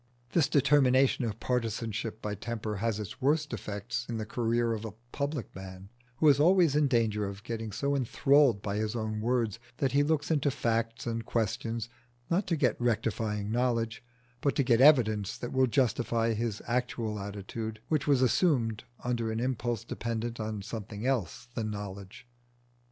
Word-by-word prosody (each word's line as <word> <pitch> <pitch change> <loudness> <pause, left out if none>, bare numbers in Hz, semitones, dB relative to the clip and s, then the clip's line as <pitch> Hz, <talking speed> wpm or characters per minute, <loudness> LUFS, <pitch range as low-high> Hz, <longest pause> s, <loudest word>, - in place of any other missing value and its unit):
This 160 -6 +3
determination 135 -3 +4
of 110 -1 -4
partisanship 115 -2 -2
by 105 - -2
temper 105 0 -4
has 110 0 -1
its 105 +6 -7
worst 145 0 +1
effects 115 +3 -4
in 115 - -2
the 110 - -3
career 115 +1 0
of 110 - -3
the 110 -2 -6 0.2
public 140 -3 -3
man, 95 0 -9 0.3
who 155 - +3
is 140 -1 +6
always 170 -2 +5
in 150 -1 +4
danger 110 -5 +1
of 100 +1 -8
getting 115 -2 -4
so 140 +7 0
enthralled 135 -3 +3
by 100 0 -2
his 110 +1 -1
own 110 -2 -2
words 115 -2 0 0.2
that 135 -2 +1
he 140 - +4
looks 150 +1 +1
into 145 -2 +2
facts 115 -4 -1
and 115 -1 -2
questions 115 0 -1 0.4
not 185 +3 +1
to 170 - +1
get 125 -6 +1
rectifying 110 -3 0
knowledge, 115 -1 0 0.4
but 140 - +1
to 140 - +3
get 120 -1 +3
evidence 110 -9 +5
that 120 - -5
will 130 0 +4
justify 115 -2 +1
his 110 -1 -3
actual 115 -3 -1
attitude 105 +2 -5
which 150 -3 0
was 135 -3 +4
assumed 120 - +2 0.2
under 115 -2 -1
an 110 - -2
impulse 120 -2 -1
dependent 115 0 -4
on 110 -2 -3
something 110 0 -6
else 125 -3 -1
than 110 -2 -2
knowledge. 100 +1 -7
115 Hz, 170 wpm, -30 LUFS, 110-130 Hz, 0.4 s, is